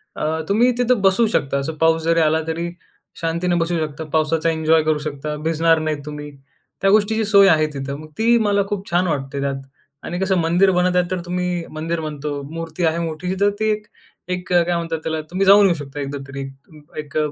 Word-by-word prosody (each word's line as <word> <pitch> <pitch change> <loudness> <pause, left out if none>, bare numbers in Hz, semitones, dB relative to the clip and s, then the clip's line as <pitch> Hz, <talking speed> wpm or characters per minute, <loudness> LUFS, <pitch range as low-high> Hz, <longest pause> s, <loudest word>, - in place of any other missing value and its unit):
अ, 160 +1 -1
तुम्ही 235 +5 +4
तिथं 245 -2 +2
बसू 195 +4 +4
शकता, 140 0 +1
असं 145 +4 -3
पाऊस 165 0 +3
जरी 165 +1 +2
आला 160 0 +2
तरी 165 +1 -2 0.5
शांतीने 170 +2 0
बसू 170 +1 0
शकता. 155 0 -4
पावसाचा 160 +1 +1
एन्जॉय 160 0 +2
करू 155 0 +1
शकता, 150 +1 -4
भिजणार 165 0 +3
नाही 155 -1 -1
तुम्ही 150 -1 -7 0.5
त्या 195 - +3
गोष्टीची 215 +1 +3
सोय 200 -2 +6
आहे 155 -1 +4
तिथं. 140 0 -4
मग 155 - -10
ती 235 +2 +4
मला 205 -2 +2
खूप 200 -1 -4
छान 175 +2 +2
वाटते 140 -3 -3
त्यात. 140 -1 -2 0.4
आणि 175 +1 -4
कसं 190 -1 +1
मंदिर 175 +4 +3
बनत 180 0 +1
आहेत 180 0 +1
तर 185 - -1
तुम्ही 180 -1 -2
मंदिर 165 +2 -2
म्हणतो. 150 -2 -4
मूर्ती 165 +1 -5
आहे 160 +1 +1
मोठी 165 +3 -3
तर 205 - +5
ती 220 0 +2
एक, 210 0 -3 0.4
एक 180 -1 -3
काय 175 0 +3
म्हणतात, 165 -1 -2
त्याला 160 -1 -2
तुम्ही 195 +2 0
जाऊन 200 +1 +8
येऊ 185 - +4
शकता 145 -2 -8
एकदा 140 +1 -4
तरी 140 0 -6 0.6
एक 145 +1 -7
165 Hz, 200 wpm, -20 LUFS, 155-185 Hz, 0.6 s, जाऊन